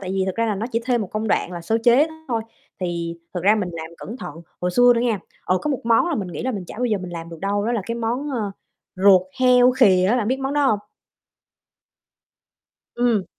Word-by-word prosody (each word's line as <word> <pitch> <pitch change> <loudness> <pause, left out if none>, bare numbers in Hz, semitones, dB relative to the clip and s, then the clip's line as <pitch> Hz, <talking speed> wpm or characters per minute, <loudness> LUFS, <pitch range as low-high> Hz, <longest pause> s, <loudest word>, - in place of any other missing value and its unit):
tại 185 -2 -5
vì 195 - 0
thật 190 - -2
ra 230 0 +1
là 210 - 0
nó 215 +4 -3
chỉ 230 - +1
thêm 245 -2 +1
một 205 - -4
công 215 0 -2
đoạn 180 - 0
là 175 - -5
sơ 220 +7 0
chế 250 +6 +6 0.2
thôi, 230 -2 -1 0.4
thì 170 -2 -3 0.2
thật 180 - -2
ra 205 +3 +5
mình 200 -4 -1
làm 160 -1 -6
cẩn 225 - -7
thận. - - -8 0.3
Hồi 180 0 0
xưa 245 +6 +6
nữa 230 - +1
nghe, 235 -4 +1 0.3
ờ, 185 - +1
có 300 - -1
một 270 - -2
món 230 +8 +3
là 340 - 0
mình 200 -9 -3
nghĩ 175 - -6
là 260 - -1
mình 200 -5 -5
chả - - -10
bao 250 - 0
giờ 215 -4 +1
mình 180 -1 -7
làm 165 0 -6
được 165 -1 -10
đâu, 205 +1 -1
đó 235 - 0
là 230 - 0
cái 230 - -2
món, 235 +5 -2
ơ, 220 -6 -2 0.5
ruột 190 -1 +6 0.2
heo 250 0 +6
khìa 200 -8 +4
á, 245 - +3
bạn 220 -3 0
biết 260 - 0
món 270 +1 -2
đó 290 -1 +3
hông? 215 -6 +2 2.2
Ừm. 235 -5 +1
220 Hz, 255 wpm, -22 LUFS, 185-245 Hz, 2.2 s, chế